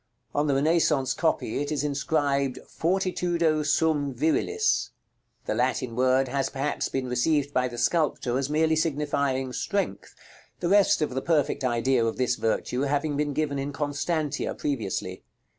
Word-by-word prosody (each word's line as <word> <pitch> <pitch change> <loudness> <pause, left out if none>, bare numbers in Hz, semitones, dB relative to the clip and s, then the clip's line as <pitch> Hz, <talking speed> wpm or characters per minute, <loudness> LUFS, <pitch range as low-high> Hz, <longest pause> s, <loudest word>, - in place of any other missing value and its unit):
On 145 +1 +1
the 140 - +2
Renaissance 145 -2 +2
copy 160 -6 0
it 145 - -3
is 145 -2 -1
inscribed 140 -2 0
"FORTITUDO 170 -3 0
SUM 145 -2 +1
VIRILIS." 430 - +1 0.6
The - - -1
Latin 125 -4 -1
word 130 +1 +3
has, 135 +2 -1
perhaps, 140 +2 -2
been 135 -1 -2
received 145 +3 +1
by 125 0 +2
the 120 -1 -8
sculptor 145 -4 +1
as 135 0 -2
merely 160 +1 +2
signifying 140 -4 0
"Strength," 200 +7 -3 0.4
the 170 - -1
rest 200 -5 +4
of 150 - -2
the 130 - -1
perfect 150 -4 +1
idea 125 0 +2
of 115 -1 -1
this 130 -1 +1
virtue 125 +3 -1
having 145 +1 0
been 145 0 -1
given 145 -1 -1
in 140 +1 -3
"Constantia" 145 +1 -2
previously. 125 -10 -3
145 Hz, 150 wpm, -26 LUFS, 130-155 Hz, 0.6 s, rest